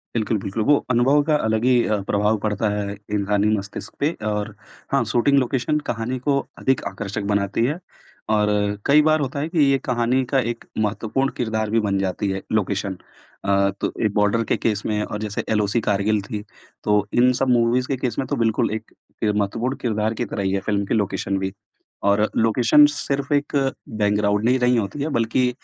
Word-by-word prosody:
बिल्कुल, 110 -1 0
बिल्कुल, 100 +3 -3
वो 145 +6 +5 0.2
अनुभव 130 +4 +4
का 155 - +4
अलग 110 0 0
ही 125 -2 +4
अ, 105 -1 0
प्रभाव 105 +2 +2
पड़ता 105 0 0
है 105 -1 -2 0.2
इंसानी 105 0 +1
मस्तिष्क 100 +1 -7
पे 145 +3 +2
और 105 0 -2 0.4
हाँ, 135 -2 +3
शूटिंग 120 +5 +2
लोकेशन 130 +4 0
कहानी 120 +3 -2
को 140 +2 +1 0.2
अधिक 130 -1 +1
आकर्षक 100 +1 -5
बनाती 100 +2 0
है, 150 +7 -1 0.5
और 105 -1 +3 0.4
कई 145 +2 +6
बार 155 +1 +3
होता 140 0 -2
है 150 +3 -2
कि 165 -1 -1
ये 135 - +3
कहानी 125 +1 +1
का 135 - +3
एक 115 - -10
महत्वपूर्ण 110 +5 0
किरदार 110 -3 -1
भी 115 +2 +2
बन 100 -2 0
जाती 95 +1 -1
है, 95 0 -3
लोकेशन। 100 -2 -1 0.5
अ, 100 0 +3
तो - - 0
एक 105 - +1
बॉर्डर 105 +2 +2
के - - +3
केस 105 -3 -1
में 105 -1 0
और 105 - -5
जैसे 105 -1 -3
एलओसी 105 +1 +1
कारगिल 105 +1 +1
थी, 105 +1 -6 0.4
तो 105 -1 +2
इन 125 +1 +5
सब 135 - +1
मूवीज़ 120 +1 +2
के 135 - -1
केस 125 -3 -3
में 135 - -2
तो - - -1
बिल्कुल 115 -3 +1
एक 110 0 -8 0.3
किर 105 -2 +1
महत्वपूर्ण 115 +6 -1
किरदार 110 -2 0
की 120 +2 -3
तरह 100 -1 -4
ही 95 - 0
है, 100 - +1
फ़िल्म 100 -1 0
की - - -2
लोकेशन 100 -2 -1
भी। 95 0 -3 0.5
और 100 +1 +3
लोकेशन 115 +6 +5
सिर्फ़ 140 +1 -2
एक 145 0 0 0.4
बैकग्राउंड 105 0 +2
नहीं 125 +2 +3
रही 125 0 +3
होती 115 +6 -2
है, 155 - -2
बल्कि 120 0 +1
110 Hz, 195 wpm, -22 LUFS, 105-125 Hz, 0.5 s, कई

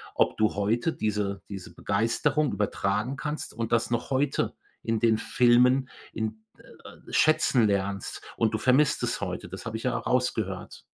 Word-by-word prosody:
ob - - +2
du 110 -2 +2
heute 115 +10 +1
diese 105 -2 -2
diese 95 -3 -8
Begeisterung 130 +9 +1
übertragen 105 +5 -1
kannst 150 0 -4
und 115 0 -4
das 115 +1 +1
noch 120 +1 -1
heute 135 +1 0 0.3
in 115 -1 -1
den 115 -2 +3
Filmen 125 +2 +4 0.2
in 110 0 -4
äh, - - -15
schätzen 130 -7 +4
lernst 100 -1 -2
und 115 -1 +1
du - - +1
vermisst 130 +5 +3
es - - -1
heute, - - -4
das - - -9
habe 110 0 -3
ich - - -9
ja 125 -1 0
rausgehört. 125 +2 -2
115 Hz, 160 wpm, -27 LUFS, 105-125 Hz, 0.3 s, Filmen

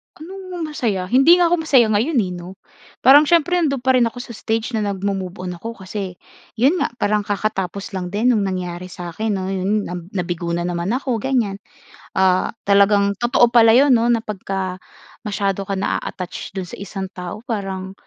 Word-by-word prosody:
Anong 365 +1 -7
masaya? 215 -10 -1
Hindi 270 +7 +7
nga 355 - +4
ako 350 -2 +2
masaya 240 -7 +5
ngayon, 245 +9 +1
eh, 180 - -4
'no. 175 +1 -9 0.5
Parang 290 +3 +8
siyempre 345 +2 +3
nandun 275 -6 0
pa 260 - +4
rin 245 -2 +4
ako 230 - -8
sa - - -10
stage 225 +2 -2
na 220 - 0
nagmo-move-on 195 -2 -3
ako 230 +5 -6
kasi 190 -1 -5 0.4
yun 275 +10 +3
nga, - - 0
parang 210 -1 +1
kakatapos 200 -1 -2
lang 185 -2 -3
din 215 +6 +2
nung 215 - +1
nangyari 180 -1 -4
sa'kin 180 +4 -5
'no, 185 - -3
yun 195 +2 0
na - - -6 0.2
nabigo 175 -2 -2
na 175 - -2
naman 175 +1 -2
ako, 255 -3 -1
ganiyan. 230 -7 0 0.6
Ah, 185 -1 +3 0.2
talagang 200 0 +4
totoo 240 0 +3
pala 225 -1 +7
yun 275 0 +5
'no, 235 -1 +3
na 230 -2 +2
pagka 195 -2 -4 0.5
masyado 200 -1 -1
ka 200 - -1
naa-attach 185 0 -4
dun 190 -1 -3
sa 175 - -9
isang 195 0 -5
tao 180 +4 -7
parang 190 -4 -4
205 Hz, 180 wpm, -20 LUFS, 185-240 Hz, 0.6 s, Parang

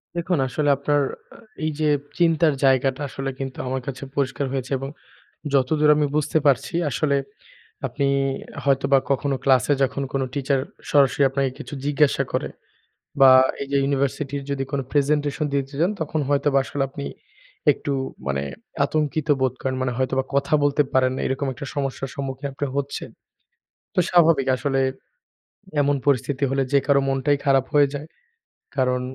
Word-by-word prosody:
দেখুন 170 0 0
আসলে 145 +3 0
আপনার 145 +1 +1 0.3
আ - - -13 0.3
এইযে 155 0 -1 0.3
চিন্তার 165 -2 +4
জায়গাটা 135 +1 +2
আসলে 135 +1 -4
কিন্তু 135 -1 -5
আমার 130 0 -2
কাছে 135 0 -5
পরিষ্কার 140 0 -1
হয়েছে 130 0 -3
এবং 135 0 -5 0.6
যতদূর 150 +3 +3
আমি 150 -1 +2
বুঝতে 150 +1 +1
পারছি 140 +2 +2 0.2
আসলে 140 +2 +1 0.7
আপনি 140 - -1 0.6
হয়তোবা 140 0 +3
কখনো 140 +1 +1
ক্লাসে 135 +1 +4
যখন 140 +1 -1
কোনো 135 -1 0
টিচার 140 -1 0 0.3
সরাসরি 140 -1 +4
আপনাকে 135 0 0
কিছু - - -8
জিজ্ঞাসা 145 0 +2
করে - - -1 0.7
বা 135 -1 +9 0.3
এইযে 140 0 -2
ইউনিভার্সিটির 140 0 -1
যদি 135 -1 -1
কোন 140 - -1
প্রেজেন্টেশন 145 +1 +1
দিতে 140 0 -2
চান 175 +4 +3
তখন 155 0 -1
হয়তোবা 140 -1 +2
আসলে 145 - -3
আপনি 140 +1 -7 0.7
একটু 145 - -4 0.3
মানে 70 0 -1 0.4
আতঙ্কিত 155 0 -1
বোধ 130 -2 +2
করেন 130 -1 -1
মানে 125 -1 -1
হয়তোবা 130 0 0
কথা 140 +2 +1
বলতে 145 +1 +3
পারেন 130 -1 +3
না। - - -3
এরকম 135 +1 -1
একটা 130 +4 -8
সমস্যার 135 -1 -3
সম্মুখীন 135 0 -4
আপনি 145 +1 -3
হচ্ছেন। 140 0 -3 0.8
তো - - +1
স্বাভাবিক 165 -6 +4
আসলে 135 0 -1 1.0
এমন 145 0 +2
পরিস্থিতি 140 0 +1
হলে 135 0 +1
যে 140 - +6
কারো 140 -1 +4
মনটাই 135 +2 +1
খারাপ 135 -1 +4
হয়ে 145 -1 +5
যায়। 145 +2 -5 0.7
কারণ 125 -1 +1
140 Hz, 150 wpm, -23 LUFS, 135-145 Hz, 1.0 s, বা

